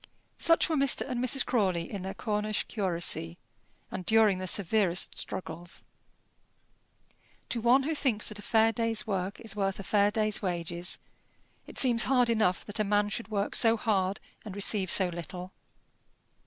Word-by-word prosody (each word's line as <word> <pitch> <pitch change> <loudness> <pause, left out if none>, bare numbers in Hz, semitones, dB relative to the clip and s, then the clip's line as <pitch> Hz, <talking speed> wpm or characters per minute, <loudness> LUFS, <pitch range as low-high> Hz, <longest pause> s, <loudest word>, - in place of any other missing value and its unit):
Such 330 0 +4
were 320 - -1
Mr. 275 -2 +2
and 250 -2 -3
Mrs. 255 +1 +4
Crawley 185 -8 -1
in 200 - -5
their 190 +1 -6
Cornish 210 -1 -2
curacy, 170 - -2 0.5
and 185 - -5
during 215 -2 +3
their 185 - -5
severest 190 -1 +1
struggles. 175 -1 -7 1.7
To 235 - -1
one 250 +4 +4
who 315 +4 -2
thinks 255 -8 0
that 210 -1 -7
a - - -8
fair 220 +1 +3
day's 230 -1 0
work 195 -2 -3
is 220 -3 -4
worth 195 -1 -2
a - - -6
fair 205 +1 +2
day's 215 0 -1
wages, 175 -2 -3 0.7
it - - -9
seems 240 -3 +5
hard 250 -3 +2
enough 215 -6 0
that 205 +1 -3
a - - +2
man 205 0 +1
should 230 +2 -5
work 205 -2 -3
so 230 -1 +4
hard 200 -3 -1 0.2
and 205 -3 -9
receive 200 -1 +2
so 185 +2 +4
little. 180 +2 -8
210 Hz, 165 wpm, -28 LUFS, 185-225 Hz, 1.7 s, seems